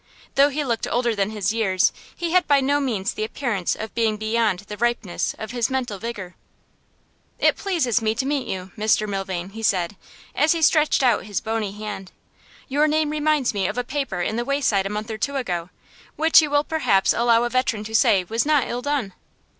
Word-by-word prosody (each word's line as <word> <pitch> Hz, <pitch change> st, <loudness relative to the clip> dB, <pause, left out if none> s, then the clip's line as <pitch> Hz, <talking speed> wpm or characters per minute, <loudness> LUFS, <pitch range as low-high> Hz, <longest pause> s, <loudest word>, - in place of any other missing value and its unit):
Though 280 Hz, +1 st, +5 dB
he 295 Hz, +1 st, -2 dB
looked 235 Hz, -4 st, -1 dB
older 240 Hz, -2 st, 0 dB
than 200 Hz, 0 st, 0 dB
his 215 Hz, -1 st, -1 dB
years, 195 Hz, -5 st, +2 dB, 0.2 s
he 340 Hz, -1 st, -3 dB
had 360 Hz, 0 st, +3 dB
by 285 Hz, -1 st, +5 dB
no 280 Hz, +2 st, +1 dB
means 225 Hz, -9 st, -1 dB
the 215 Hz, -, -3 dB
appearance 215 Hz, -5 st, -2 dB
of 220 Hz, 0 st, -7 dB
being 220 Hz, -2 st, +1 dB
beyond 215 Hz, -3 st, 0 dB
the 210 Hz, +1 st, -8 dB
ripeness 235 Hz, -4 st, -1 dB
of 220 Hz, 0 st, -6 dB
his 240 Hz, -2 st, 0 dB
mental 245 Hz, -6 st, -2 dB
vigour. 205 Hz, -5 st, -6 dB, 1.0 s
'It -, -, +3 dB
pleases 315 Hz, -, 0 dB
me 220 Hz, 0 st, 0 dB
to 260 Hz, -, -1 dB
meet 280 Hz, -1 st, -1 dB
you, 185 Hz, 0 st, -5 dB
Mr 215 Hz, -1 st, +1 dB
Milvain,' 195 Hz, -2 st, -4 dB
he 225 Hz, +2 st, -8 dB
said, 185 Hz, -3 st, 0 dB, 0.4 s
as 305 Hz, +3 st, +3 dB
he 330 Hz, -1 st, -2 dB
stretched 305 Hz, -2 st, +3 dB
out 240 Hz, -6 st, +2 dB
his 205 Hz, -3 st, -2 dB
bony 220 Hz, -3 st, -3 dB
hand. 210 Hz, -3 st, -7 dB, 0.6 s
'Your 290 Hz, +3 st, +2 dB
name 305 Hz, 0 st, +1 dB
reminds 300 Hz, -4 st, +1 dB
me 195 Hz, -2 st, 0 dB
of -, -, -4 dB
a 245 Hz, -, 0 dB
paper 270 Hz, -9 st, -3 dB
in 215 Hz, +5 st, -1 dB
The 240 Hz, -, -1 dB
Wayside 250 Hz, -8 st, +1 dB
a -, -, -5 dB
month 210 Hz, +2 st, -4 dB
or 215 Hz, -, -5 dB
two 280 Hz, +4 st, -2 dB
ago, 180 Hz, -10 st, -3 dB, 0.5 s
which 320 Hz, +1 st, +6 dB
you 305 Hz, -, -1 dB
will 290 Hz, 0 st, +2 dB
perhaps 250 Hz, -12 st, +2 dB
allow 235 Hz, 0 st, +3 dB
a 240 Hz, -, 0 dB
veteran 255 Hz, -4 st, 0 dB
to 220 Hz, +1 st, -8 dB
say 220 Hz, -4 st, +4 dB
was 225 Hz, +6 st, -1 dB
not 295 Hz, -4 st, +2 dB
ill 245 Hz, +1 st, -3 dB
done. 275 Hz, -8 st, -2 dB
230 Hz, 210 wpm, -23 LUFS, 205-275 Hz, 1.0 s, which